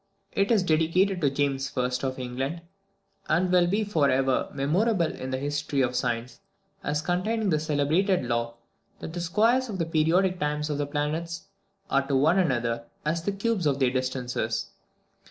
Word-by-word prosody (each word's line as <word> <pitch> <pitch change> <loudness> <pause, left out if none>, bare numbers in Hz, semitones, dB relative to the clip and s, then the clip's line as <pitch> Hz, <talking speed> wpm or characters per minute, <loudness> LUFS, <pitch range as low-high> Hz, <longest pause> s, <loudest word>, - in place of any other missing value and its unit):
It 195 0 +1
is 220 -5 +4
dedicated 180 +3 +2
to 145 - +3
James 140 0 -1
I. 125 - +2 0.2
of 130 -1 -2
England, 130 +6 -3 0.7
and 180 +4 +2
will 180 -1 +4
be 205 +5 +1
for 160 -9 +2
ever 130 0 +1
memorable 170 +8 +1
in 130 - -6
the 130 - -1
history 145 0 -1
of 125 0 -1
science, 120 0 -2 0.4
as 150 +1 -1
containing 195 +5 0
the 155 - +2
celebrated 155 +3 +1
law 115 -1 -1 0.4
that 160 - -7
the 175 - -3
squares 230 +9 +2
of 200 - -4
the 165 - 0
periodic 170 +4 +2
times 150 +1 -1
of 145 - -2
the 145 - -1
planets 155 +3 -3 0.5
are 135 0 +2
to 140 - +1
one 155 +8 +4
another 120 -8 0 0.2
as 160 +2 0
the 200 - -1
cubes 200 -3 0
of 140 -2 +1
their 130 -3 +2
distances. 125 -3 -2
150 Hz, 170 wpm, -27 LUFS, 135-180 Hz, 0.7 s, is